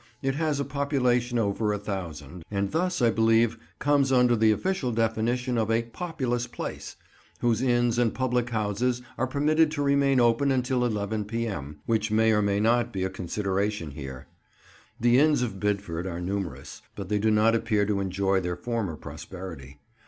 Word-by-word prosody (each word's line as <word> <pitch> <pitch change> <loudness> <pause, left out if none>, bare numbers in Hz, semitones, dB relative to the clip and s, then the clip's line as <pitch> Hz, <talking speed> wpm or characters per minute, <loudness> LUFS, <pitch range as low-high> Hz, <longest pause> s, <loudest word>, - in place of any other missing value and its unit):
It 135 0 +1
has 150 0 0
a 140 - -1
population 125 -3 0
of 115 - +2
over 105 +2 0
a - - -1
thousand, 85 -6 -6
and 100 -1 -1
thus, 180 -3 0
I 115 - +5
believe, 115 +1 +3 0.2
comes 140 -1 +2
under 125 -2 +4
the 110 -1 +4
official 145 - 0
definition 115 +2 0
of 110 -1 0
a 115 +1 +2
"populous 125 -2 -3
place," 120 - -6 0.5
whose 120 -1 +2
inns 120 -2 +2
and 120 -2 +3
public 125 -1 0
houses 120 +3 -1 0.2
are 130 - +1
permitted 150 +4 +2
to 145 -2 -1
remain 140 -1 +3
open 120 +3 +3
until 125 -1 +1
11 105 -2 -2
p.m., 100 -11 -4
which 110 -1 0
may 110 +1 +3
or 105 -1 +3
may 100 -1 +1
not 120 +2 +2
be 95 -4 -2
a 95 - -2
consideration 95 -1 -2
here. 65 -2 -8 0.7
The 120 +2 +4
inns 150 -3 +4
of 110 -5 -4
Bidford 100 -4 -2
are 85 -2 -4
numerous, 90 -7 -5
but 100 -2 -6
they 105 -1 +1
do 110 +2 +2
not 110 +1 +4
appear 110 -3 +1
to 100 -1 0
enjoy 95 0 +1
their 90 -1 -3
former 115 -8 -2
prosperity. 80 -1 -9
115 Hz, 175 wpm, -27 LUFS, 100-125 Hz, 0.7 s, I